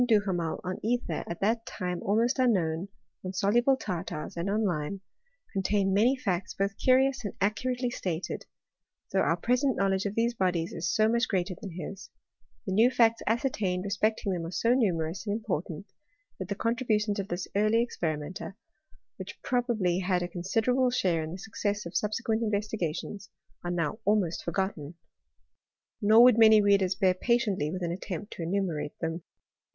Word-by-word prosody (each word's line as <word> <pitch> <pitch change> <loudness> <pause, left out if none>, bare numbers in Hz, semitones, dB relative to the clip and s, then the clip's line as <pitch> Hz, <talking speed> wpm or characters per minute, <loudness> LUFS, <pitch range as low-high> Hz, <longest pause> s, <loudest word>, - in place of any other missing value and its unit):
Duhamel 200 -8 +1
on 185 0 -4
ether, 245 +3 -1
at 170 - -6
that 225 +3 +1
time 180 -1 -4
almost 230 +6 +1
unknown, 185 -8 +1 0.4
on 185 0 -5
soluble 240 +8 +3
tartars, 175 -4 -5
and 170 +3 -2
on 215 +2 +1
lime, 175 +1 -2 0.5
con 195 - 0
tain 195 0 +1
many 230 +7 +4
facts 190 -7 -2
both 200 0 -1
curious 260 0 +3
and 205 - -5
accurately 245 +5 0
stated; 180 -6 -4 0.6
though - - +2
our - - +2
present 250 +1 +1
knowledge 195 0 +1
of 200 - -5
these 235 +1 +1
bodies 180 -6 0
is 175 +2 -2
so 215 0 +3
much 235 +1 +2
greater 185 -1 -1
than 190 - -7
his 185 +3 -7 0.3
— - - -41
the 190 - -3
new 225 +5 +5
facts 230 -2 +3
ascertained 215 -6 0
re 200 - -4
specting 210 0 0
them 175 -2 -3
are 165 - -4
so 230 +6 +2
numerous 185 -5 0
and 205 - 0
important, 170 -4 -4 0.5
that 185 - -4
the 200 - -3
contributions 220 -2 0
of 195 - -3
this 175 0 -4
early 215 +3 +3
experimenter, 170 -2 -4 0.6
which - - -8
pro 250 -1 +1
bably 195 -7 0
had 180 -1 +1
a - - -2
considerable 225 +9 +1
share 180 -9 +1
in 155 - -6
the 180 - -6
success 205 0 -3
of 170 - -8
sub 210 - +1
sequent 225 0 -1
investigations, 205 -3 -3 0.3
are 175 - -3
now 175 +4 -1
ahnost 205 -5 +2
forgotten. 170 -3 -3 1.1
Nor 220 +3 +7
would 245 -2 +6
many 220 -1 +8
readers 200 -2 +3
bear 190 -2 +3
patiently 210 - +1
with 185 +1 -4
an* 170 - -1
attempt 195 +2 -5
to - - -8
enumerate 170 -4 -2
them. 165 +1 -3
200 Hz, 175 wpm, -28 LUFS, 180-225 Hz, 1.1 s, many